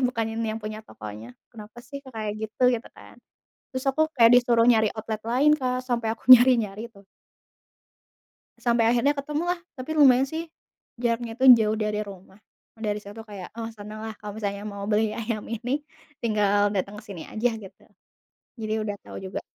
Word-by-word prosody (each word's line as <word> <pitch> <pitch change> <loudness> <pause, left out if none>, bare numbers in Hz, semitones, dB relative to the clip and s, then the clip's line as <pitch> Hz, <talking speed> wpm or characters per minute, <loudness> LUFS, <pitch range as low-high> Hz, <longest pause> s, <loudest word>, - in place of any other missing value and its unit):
bukan 245 -3 0
yang 225 -1 -2
punya 215 0 -6
tokonya. 110 - -10 0.2
Kenapa 215 +1 -12
sih 280 +3 -8
kok 265 - -12
kayak 215 0 -4
gitu? 250 +3 +1
Gitu 235 -1 -3
kan. - - -15 0.6
Terus 260 +1 -4
aku 315 +4 +2
kayak 230 -1 +7
disuruh 240 -2 +4
nyari 220 -3 +5
outlet 220 -1 -5
lain, 265 +6 +3
Kak, 255 -2 -1
sampai 235 -3 -1
aku 230 - -13
nyari-nyari 235 -3 +5
tuh. 200 -1 -18 1.5
Sampai 235 -2 +2
akhirnya 245 +5 +3
ketemu 295 +3 -3
lah, 350 - -11 0.2
tapi 255 +5 -6
lumayan 270 -4 +6
sih, 320 +3 -6 0.5
jaraknya 235 -1 -2
itu 265 - +1
jauh 215 0 +1
dari 210 -1 -1
rumah, 195 -1 -11 0.4
dari 210 -2 -1
situ 205 +3 -9
kayak, 195 -3 -9
oh 225 0 -4
seneng 210 +1 -9
lah 220 0 -5
kalau 210 -1 -7
misalnya 200 -1 -3
mau 200 -1 -6
beli 215 0 +1
ayam 225 -2 -3
ini 245 +6 -3 0.4
tinggal 205 -2 +2
datang 200 +2 -2
ke - - -15
sini 185 -5 -8
aja 230 +3 0
gitu. 195 -1 -13 0.8
Jadi 215 0 -2
udah 205 -1 -3
tau - - -10
juga. 190 0 -5
225 Hz, 175 wpm, -25 LUFS, 210-245 Hz, 1.5 s, kayak